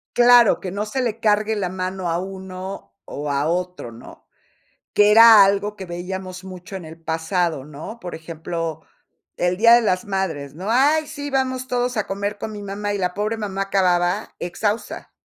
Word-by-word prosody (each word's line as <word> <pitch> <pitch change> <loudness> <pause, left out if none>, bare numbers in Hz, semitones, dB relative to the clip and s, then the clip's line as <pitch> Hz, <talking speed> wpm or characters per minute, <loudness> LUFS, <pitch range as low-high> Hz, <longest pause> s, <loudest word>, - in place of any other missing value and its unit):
Claro, 240 -2 +6
que 185 - -5
no 205 +2 -2
se 260 +5 -3
le 230 -2 -2
cargue 215 0 +2
la 195 -3 -1
mano 185 -1 -3
a 165 - 0
uno, 190 - -7
o 145 0 -5
a 140 +2 0
otro, 180 -7 -3
¿no? 115 - -14 0.7
Que 210 0 +5
era 225 -2 +9
algo 200 +1 0
que 190 - -8
veíamos 185 +1 -6
mucho 185 +1 -9
en 180 - -8
el 160 +1 -11
pasado, 160 -2 -1
¿no? 155 +10 -9
Por 180 - -7
ejemplo, 165 0 -5 0.5
el 180 0 0
día 230 +3 +7
de 240 - +6
las 185 -4 0
madres, 170 -9 -3
¿no? 190 +7 -5
¡Ay, 295 +5 +3
sí! 290 -2 -6
Vamos 260 -1 -1
todos 245 0 -1
a 215 - -1
comer 200 +1 -3
con 215 - -5
mi 205 -1 -7
mamá, 205 +1 -3
y 205 - -2
la 180 -1 -1
pobre 210 +2 -1
mamá 195 -3 -3
acababa, 185 0 +1
exhausta. 205 +5 -3
190 Hz, 185 wpm, -21 LUFS, 175-215 Hz, 0.7 s, era